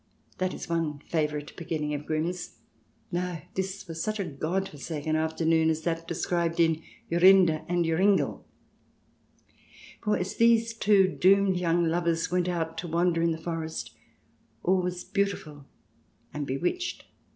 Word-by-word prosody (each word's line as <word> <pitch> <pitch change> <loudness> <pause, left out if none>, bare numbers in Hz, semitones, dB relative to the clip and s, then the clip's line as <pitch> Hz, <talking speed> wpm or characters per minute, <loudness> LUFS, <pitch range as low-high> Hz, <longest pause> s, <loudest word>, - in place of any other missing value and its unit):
(That 185 0 -1
is - - -7
one 165 -3 -1
favourite 150 -1 -2
beginning 155 -3 -3
of 145 0 -5
Grimm's.) 165 +3 -2 0.5
No, 175 -1 -2
this 190 0 -4
was 165 -1 -5
such 215 0 -2
a - - +1
God 170 +5 -2
forsaken 155 +1 -4
afternoon 160 0 +2
as 160 0 -1
that 165 0 -2
described 170 0 -1
in 165 -1 +3
" - - -30
Jorinde 175 -2 +6
and 175 -1 +1
Joringel." 190 +5 +2 1.6
For 210 -2 +1
as 180 +1 -4
these 230 0 +4
two 205 -4 +4
doomed 190 +1 +3
young 170 -1 +2
lovers 165 0 0
went 180 0 +1
out 165 -2 -2
to 175 - -5
wander 170 0 +1
in 170 - +3
the 160 - -2
forest 160 -1 -5 0.7
all 185 +1 +3
was 180 0 -3
beautiful 155 -8 -2 0.7
and 145 -1 -4
bewitched. 180 - -2
170 Hz, 145 wpm, -28 LUFS, 160-185 Hz, 1.6 s, Jorinde